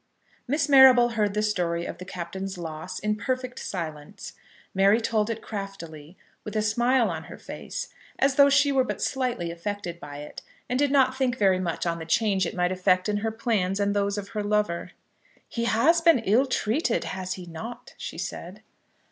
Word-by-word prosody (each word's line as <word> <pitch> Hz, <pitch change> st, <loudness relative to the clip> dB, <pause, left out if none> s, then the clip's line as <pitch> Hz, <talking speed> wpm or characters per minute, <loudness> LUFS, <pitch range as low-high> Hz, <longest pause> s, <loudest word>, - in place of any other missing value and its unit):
Miss 285 Hz, +3 st, +1 dB
Marrable 260 Hz, -3 st, +8 dB
heard 210 Hz, -3 st, 0 dB
the 210 Hz, -, +1 dB
story 175 Hz, -5 st, 0 dB
of -, -, -7 dB
the 185 Hz, -, -7 dB
Captain's 190 Hz, +1 st, -6 dB
loss 165 Hz, +2 st, -6 dB
in 210 Hz, 0 st, -1 dB
perfect 255 Hz, +3 st, -3 dB
silence. 165 Hz, +1 st, -6 dB, 0.4 s
Mary 195 Hz, +3 st, +4 dB
told 225 Hz, -1 st, 0 dB
it 225 Hz, -1 st, -4 dB
craftily, 175 Hz, -6 st, -8 dB, 0.3 s
with 210 Hz, -, -7 dB
a 215 Hz, -, +1 dB
smile 240 Hz, 0 st, +2 dB
on 160 Hz, -1 st, -6 dB
her -, -, -10 dB
face, -, -, -7 dB, 0.3 s
as 275 Hz, 0 st, +3 dB
though 280 Hz, +1 st, +6 dB
she 285 Hz, 0 st, +4 dB
were 265 Hz, -1 st, +3 dB
but -, -, -4 dB
slightly 245 Hz, -10 st, -1 dB
affected 175 Hz, 0 st, -5 dB
by 145 Hz, -2 st, -9 dB
it, 150 Hz, +1 st, -9 dB, 0.3 s
and 250 Hz, +1 st, -1 dB
did 290 Hz, 0 st, +3 dB
not 265 Hz, -2 st, +4 dB
think 260 Hz, -2 st, 0 dB
very 190 Hz, -4 st, +3 dB
much 175 Hz, -2 st, -2 dB
on 170 Hz, -1 st, -1 dB
the 160 Hz, -, -6 dB
change 195 Hz, -1 st, +2 dB
it -, -, -6 dB
might 180 Hz, 0 st, +1 dB
effect 185 Hz, 0 st, +2 dB
in 210 Hz, 0 st, 0 dB
her 220 Hz, +2 st, -1 dB
plans 215 Hz, -5 st, -1 dB
and 200 Hz, 0 st, +1 dB
those 200 Hz, 0 st, 0 dB
of 205 Hz, -1 st, -5 dB
her 215 Hz, -2 st, -3 dB
lover. 205 Hz, -4 st, -1 dB, 0.5 s
"He 235 Hz, -1 st, -3 dB
has 300 Hz, +10 st, +3 dB
been 330 Hz, -3 st, +6 dB
ill 235 Hz, +8 st, +3 dB
treated; 245 Hz, +1 st, 0 dB
has 185 Hz, -1 st, -4 dB
he 185 Hz, -, -9 dB
not?" 230 Hz, +9 st, -8 dB
she -, -, -6 dB
said. -, -, -6 dB
210 Hz, 190 wpm, -26 LUFS, 180-245 Hz, 0.5 s, Marrable